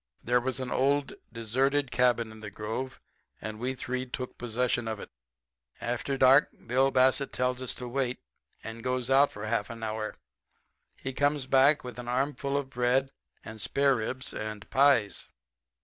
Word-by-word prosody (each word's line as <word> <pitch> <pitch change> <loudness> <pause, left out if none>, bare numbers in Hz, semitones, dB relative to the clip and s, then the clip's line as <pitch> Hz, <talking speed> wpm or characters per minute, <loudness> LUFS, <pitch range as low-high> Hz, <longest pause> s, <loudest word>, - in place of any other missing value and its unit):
"There 125 +1 +2
was 130 +1 -1
an 130 -1 -4
old, 140 +2 +1 0.2
deserted 130 +4 0
cabin 120 -3 +2
in 110 - -11
the 105 -1 -7
grove, 110 +6 -5 0.4
and 110 0 -6
we 130 +2 -2
three 130 0 -3
took 125 0 -5
possession 120 0 -1
of 110 -2 -3
it. - - -9 0.7
After 120 +3 -2
dark 135 +2 +6 0.2
Bill 130 +3 +3
Bassett 130 +1 +3
tells 125 0 0
us 130 - -2
to 125 - -6
wait, 125 0 -1 0.4
and 115 0 -7
goes 125 0 -1
out 140 +2 +5
for 105 +1 -7
half 110 -1 -1
an 115 -1 -7
hour. 110 0 -3 0.8
He 135 - -5
comes 145 0 +1
back 135 +3 +4
with 125 -1 -7
a - - -5
armful 140 +2 0
of 140 -1 -3
bread 125 +2 +1 0.3
and 110 -1 -7
spareribs 130 -1 0
and 110 -1 -5
pies. 130 -7 +3
125 Hz, 165 wpm, -29 LUFS, 115-135 Hz, 0.8 s, dark